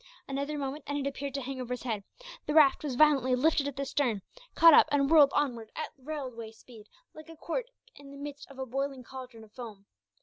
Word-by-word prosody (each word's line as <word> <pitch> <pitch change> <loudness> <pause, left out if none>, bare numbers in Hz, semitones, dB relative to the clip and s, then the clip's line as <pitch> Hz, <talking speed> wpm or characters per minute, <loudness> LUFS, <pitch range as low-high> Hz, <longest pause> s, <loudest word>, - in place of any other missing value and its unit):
Another 280 +2 -3
moment, 280 +1 -4
and 285 - -2
it 280 -1 -2
appeared 280 0 -5
to 275 - -2
hang 260 0 -5
over 250 0 -3
his - - -12
head; 220 -5 -3 0.4
the 300 - -1
raft 300 -3 +5
was 280 -4 -3
violently 270 -3 +4
lifted 285 +2 +2
at 285 - -5
the 275 +1 -3
stern, 250 -8 -1 0.3
caught 330 -1 +8
up, - - +7
and 280 0 +2
whirled 300 -4 +8
onward 240 -7 -1
at 310 - -4
railway 260 -5 -6
speed, 220 -1 -16 0.3
like 310 +1 -13
a 325 - -12
cork 480 +12 -3 0.3
in 280 -1 -13
the 280 - -11
midst 285 0 -8
of 275 - -14
a 265 - -4
boiling 270 +1 -3
cauldron 255 -3 -10
of 215 - -17
foam. 215 -5 -10
275 Hz, 225 wpm, -29 LUFS, 250-290 Hz, 0.4 s, caught